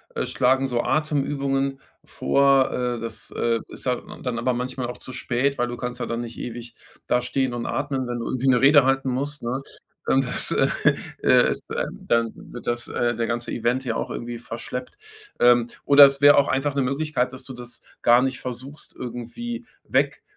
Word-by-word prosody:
äh, - - -1
schlagen 130 +2 +2
so 120 -2 0
Atemübungen 140 -2 0 0.3
vor, 140 -1 +3
äh, 125 -1 -2
das, 115 -1 -8
äh, 115 -1 +1
ist - - -11
halt 125 -1 -1
d - - -11
dann 125 -3 -2
aber 130 - +1
manchmal 125 0 -3
auch 125 - -7
zu 130 - -10
spät, 130 +2 -1
weil 120 0 +1
du 120 0 -5
kannst 125 +1 -5
ja - - -2
dann 115 0 -3
nicht 115 -1 -8
ewig 120 0 -7 0.3
da 125 - +2
stehen 130 0 -1
und 120 -1 -4
atmen, 135 -2 -2
wenn 120 0 -3
du 115 - -4
irgendwie 130 +1 -1
'ne 125 -1 +4
Rede 145 +1 +7
halten 135 0 +1
musst, 140 +4 -3
ne? 125 +3 -2 0.4
Und 135 0 +2
das, 125 - +1
äh, - - +3 0.6
äh, - - +5
ist - - -4
dann - - -2
dann 115 - 0
wird 120 - -11
das, 120 0 -1
äh 120 -1 0
der 115 0 -1
ganze 120 +1 -3
Event 125 +3 0
ja 115 -2 -1
auch - - -3
irgendwie 120 0 -5
verschleppt. 120 +2 -7 0.4
Ähm, 120 -1 +5 0.2
oder 145 0 +9
es 140 0 +6
wär 145 0 +7
auch 140 - +4
einfach 135 +2 0
'ne 140 - +2
Möglichkeit, 135 -1 -1
dass 130 0 -10
du 130 - -8
das 120 -1 -10 0.2
gar 120 +1 +6
nicht 130 0 -2
versuchst, 130 +4 -7
irgendwie 125 - -6 0.2
weg - - +1
125 Hz, 205 wpm, -24 LUFS, 120-135 Hz, 0.6 s, oder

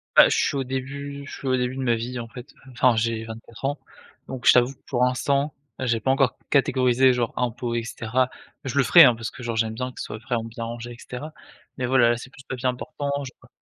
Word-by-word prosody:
Bah, - - +9
je - - +1
suis - - -1
au 135 - 0
début 140 +2 -5
je - - -10
suis 135 - -6
au 130 -1 +2
début 125 +1 -1
de 135 - -4
ma 120 -2 +2
vie, 120 +2 -4
en 115 - -6
fait. 125 +2 -11 0.2
Enfin, 125 -1 +3
j'ai 115 0 0
24 115 +3 -9
ans, 145 +2 -1 0.5
donc 130 -3 -7
je - - +9
t'avoue 125 +1 +4
que - - -37
pour 125 - +1
l'instant, 140 +3 +1 0.2
j'ai 120 -3 0
pas 130 +4 +1
encore 135 -2 +2
catégorisé, 130 -2 +4
genre, 120 -2 -1
impôts, 120 -1 -2
et 115 - -1
cetera. 120 +3 -1 0.3
Je 135 0 -4
le 140 - +5
ferai, 170 +5 +9
hein, 125 -3 +5
parce 115 0 -5
que - - -11
genre 120 -2 -3
j'aime 110 0 0
bien 125 +2 -4
que - - -13
ce - - -3
soit 105 - -7
quand 120 - +2
même 115 0 -5
bien 115 0 -6
rangé, 120 +1 -6
et 120 - -10
cetera. 150 +5 -8 0.4
Mais, 125 -2 -1
voilà, 120 -2 +4
c'est 125 - -10
plus 135 0 -15
«papier 130 0 -3
important» 140 +3 -3 0.2
j'ai 130 - -9
pas - - -18
125 Hz, 255 wpm, -24 LUFS, 115-135 Hz, 0.5 s, Bah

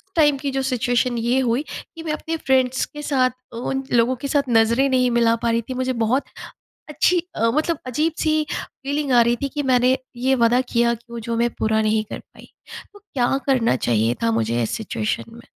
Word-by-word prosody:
Time 295 -3 +4
की 275 0 -3
जो 270 0 -1
situation 245 -1 0
ये 240 +3 +1
हुई 250 +1 +1
कि 330 -1 -9
मैं 310 - -2
अपने 325 +1 -3
फ्रेंड्स 260 -2 +1
के 295 - -10
साथ, 265 -3 +2 0.2
उन 265 +3 -3
लोगों 240 +2 +3
के - - 0
साथ 280 -1 0
नज़रें 235 +4 +3
नहीं 255 -1 +3
मिला 235 -1 +3
पा 235 - +2
रही 230 0 +1
थी। - - -2
मुझे 255 0 -1
बहुत 255 +5 +1 0.7
अच्छी 335 +4 +2 0.3
मतलब 310 +1 0
अजीब-सी 310 +3 0
फ़ीलिंग 280 0 -3
आ 240 - +6
रही 235 +1 +2
थी 280 - 0
कि 290 - -1
मैंने 255 -1 +3 0.2
ये 260 +2 +2
वादा 240 +2 +4
किया 235 0 +3
कि 235 +1 -16
वो 235 - -5
जो 230 - -1
मैं 235 +1 +1
पूरा 220 0 +1
नहीं 215 0 +1
कर - - -5
पाई। - - -18 0.4
तो 410 - -15
क्या 270 -11 -1
करना 250 - +2
चाहिए 115 0 +2
था 115 - +2
मुझे 115 +1 0
इस 110 - -2
सिचुएशन 215 0 -3
में? 235 +1 -12
255 Hz, 205 wpm, -21 LUFS, 235-275 Hz, 0.7 s, आ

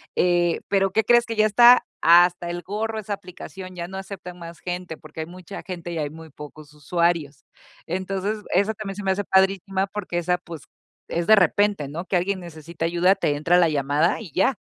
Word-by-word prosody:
eh, 175 -1 +2
pero, 195 -1 +2
¿qué 220 +4 +2
crees?, 240 +2 +4
que 230 - -5
ya 215 0 +4
está 240 +4 +6 0.2
hasta 175 +1 +5
el 175 0 -4
gorro 220 +3 -3
esa 210 0 -8
aplicación, 185 -1 -8
ya 170 0 -6
no 190 - -7
aceptan 190 -2 -8
más 170 0 -10
gente, 180 -2 -5
porque 155 +1 -13
hay - - -4
mucha 180 +3 -10
gente 175 -2 -7
y 170 - -4
hay 150 -2 -2
muy 160 +1 -12
pocos 150 0 -12
usuarios. 155 -1 -1 0.4
Entonces, 190 +4 -2 0.2
eso 200 +4 +2
también 195 -2 -6
se 205 - -7
me 190 - +1
hace 200 +1 -2
padrísima 190 0 +1
porque 190 -4 -4
esa, 180 +1 0
pues, 170 -4 -10 0.5
es 170 0 -2
de 220 - +8
repente, 200 -4 +2
¿no?, 170 +5 -6
que 190 - -2
alguien 185 +2 0
necesita 165 -1 -7
ayuda, 175 +3 +3
te 145 -6 0
entra 165 +4 +2
la 170 - +5
llamada 150 +5 +1
y 185 -9 -10
ya, 225 - +2
180 Hz, 205 wpm, -23 LUFS, 170-195 Hz, 0.5 s, de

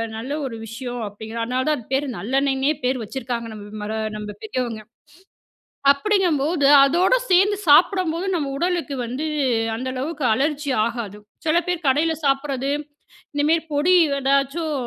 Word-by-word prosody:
நல்ல 230 +5 -6
ஒரு 245 -4 -5
விஷயம் 240 +2 -6
அப்டிங்கறோம். 220 +3 -6
அதனால 255 +2 -1
தான் 305 -1 +2
அது 240 - -11
பேர் 275 +2 +1
நல்லெண்ணெய்ன்னே 270 +4 +1
பேர் 255 -1 0
வச்சுருக்காங்க 235 0 -4
நம்மர 210 0 -7 0.2
நம்ம 210 0 -6
பெரியவங்க. 230 -1 -3 1.1
அப்டிங்கும்போது 315 -2 +1 0.2
அதோட 355 - +3 0.2
சேர்ந்து 390 +3 +4
சாப்படும்போது 350 +2 +4
நம்ம 300 -5 -1
உடலுக்கு 345 -3 -1
வந்து 255 +6 -4 0.5
அந்த 255 +3 -4
அளவுக்கு 290 +3 -4
அலர்ஜி 285 +3 -1
ஆகாது. 230 -4 -4 0.3
சில 320 +1 +3
பேர் 355 -3 -2
கடையில 300 +5 +3
சாப்படுறது, 275 -1 0 0.6
இந்தமேரி 305 +3 +2
பொடி 300 +6 +3 0.2
ஏதாச்சும் 275 +4 0
275 Hz, 130 wpm, -22 LUFS, 240-315 Hz, 1.1 s, சேர்ந்து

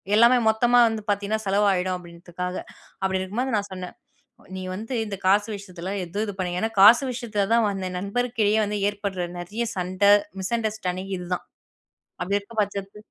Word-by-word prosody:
எல்லாமே 235 +3 +6
மொத்தமா 240 +2 +4
வந்து 220 -1 -3
பாத்தீங்கன்னா, 205 +2 -1
செலவு 200 +2 +3
ஆயிடும் 185 0 -1
அப்படீன்றதுக்காக. 175 +1 -6 0.5
அப்படி 190 0 +1
இருக்கும்போது, 230 +7 -2
நான் 205 0 -3
சொன்னேன் 185 -1 -7 0.6
"நீ 185 - -5
வந்து 225 +6 -5
இந்த 200 -2 -4
காசு 205 +3 +4
விஷயத்துல 190 -2 -7
எதுவும் 200 +5 -3
இது 205 - -5
பண் 180 -1 -2
ஏன்னா 220 - 0
காசு 220 +6 +9
விஷயத்துல 225 -4 -1
தான் 230 -1 +4
வந்து 195 -2 -4
என் 180 - -4
நண்பர்க்கிடையில 220 0 +1
வந்து 210 0 -2
ஏற்படுற 200 -3 -3
நெறைய 205 +7 -3
சண்டை, 185 +2 +2 0.3
மிஸ்அண்டர்ஸ்டேண்டிங் 195 -3 -2
இது 180 - -7
தான். - - -6 0.8
அப்படி 200 +3 +1
இருக்க 200 +3 -15
பட்சத்து 200 0 -4
200 Hz, 165 wpm, -24 LUFS, 185-220 Hz, 0.8 s, காசு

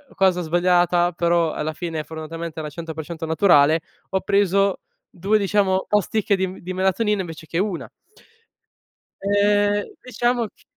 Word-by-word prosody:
cosa 185 -2 +2
sbagliata 175 +1 +2
però, 170 -1 +1
alla 155 +1 -3
fine 160 -2 -4
fortunatamente 160 +1 -7
era 150 - -4
100% 160 0 -6
naturale, 160 -2 +4 0.3
ho 190 0 0
preso 200 -1 +2 0.3
2 195 +5 +1
diciamo, 195 -1 +1
ostiche 210 0 +1
di 190 0 -1
m 185 - -9
di 185 +1 -6
melatonina 190 +2 +1
invece 160 -2 -8
che 165 - -3
una. 190 -2 -2 1.3
E 205 +1 +2 0.2
diciamo 240 -1 0
ch - - -26
180 Hz, 135 wpm, -22 LUFS, 165-200 Hz, 1.3 s, naturale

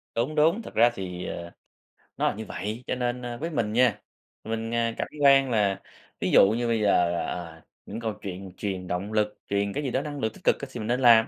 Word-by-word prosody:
Đúng, 125 +7 0
đúng, 160 +8 +4
thật - - -10
ra 120 +2 +6
thì, 90 -3 -5
ờ, 85 0 -6 0.7
nó - - +2
là - - 0
như 110 +1 -6
vậy, 105 +6 -5
cho - - 0
nên, 125 0 -2
ơ, 120 -1 -5
với 165 +6 -3
mình 115 -9 -1
nha, 120 -3 +3 0.4
mình, 115 +1 -3
ờ, 115 - +1 0.2
cảm - - -2
quan 135 -1 +6
là 100 -3 +1 0.4
ví - - 0
dụ 95 - +7
như 120 +2 0
bây 115 -2 +1
giờ, 90 -4 +3
ờ, 85 -2 -6 0.2
những 110 - -6
câu 110 -2 -2
chuyện 95 -1 -6
truyền 95 -3 -3
động 90 +4 -3
lực, 105 -1 +1
truyền 100 0 0
cái 145 - -2
gì 135 - -2
đó 130 - +1
năng 145 -1 -5
lượng 110 -3 -1
tích - - -16
cực - - +4 0.2
thì - - -6
mình 110 - -4
nên 120 +2 +1
làm, 115 -3 +7
110 Hz, 240 wpm, -26 LUFS, 100-125 Hz, 0.7 s, dụ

